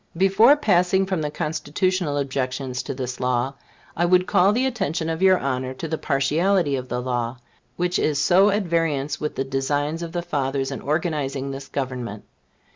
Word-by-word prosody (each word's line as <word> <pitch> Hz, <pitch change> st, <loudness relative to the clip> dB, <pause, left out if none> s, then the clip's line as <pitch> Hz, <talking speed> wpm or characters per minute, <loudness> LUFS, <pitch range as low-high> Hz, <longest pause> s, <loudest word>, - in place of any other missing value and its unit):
Before 195 Hz, -, +6 dB
passing 190 Hz, -6 st, +3 dB
from 190 Hz, -4 st, -2 dB
the 150 Hz, -, -1 dB
Constitutional 155 Hz, +2 st, -1 dB
objections 130 Hz, -2 st, -2 dB
to -, -, -5 dB
this 125 Hz, -1 st, -5 dB
law, 125 Hz, +1 st, 0 dB, 0.4 s
I 170 Hz, -, 0 dB
would 180 Hz, +1 st, +4 dB
call 195 Hz, +1 st, +4 dB
the 245 Hz, +5 st, +1 dB
attention 175 Hz, -, -1 dB
of 165 Hz, +2 st, -4 dB
your 190 Hz, -1 st, +6 dB
Honor 130 Hz, -2 st, -2 dB
to 165 Hz, -, -5 dB
the 160 Hz, 0 st, -3 dB
partiality 155 Hz, +3 st, +1 dB
of 130 Hz, -1 st, -5 dB
the 125 Hz, -, -2 dB
law, 120 Hz, -1 st, -2 dB, 0.4 s
which 180 Hz, +2 st, 0 dB
is 150 Hz, -2 st, +1 dB
so 180 Hz, +8 st, +5 dB
at 205 Hz, +1 st, +1 dB
variance 160 Hz, -4 st, -1 dB
with 150 Hz, -, -3 dB
the 135 Hz, -, -1 dB
designs 145 Hz, +4 st, -1 dB
of 170 Hz, -1 st, -5 dB
the 175 Hz, 0 st, -3 dB
Fathers 135 Hz, -5 st, -1 dB
in -, -, -5 dB
organizing 145 Hz, -3 st, -2 dB
this 135 Hz, 0 st, -7 dB
Government. 125 Hz, -6 st, -4 dB
150 Hz, 180 wpm, -23 LUFS, 135-180 Hz, 0.4 s, Before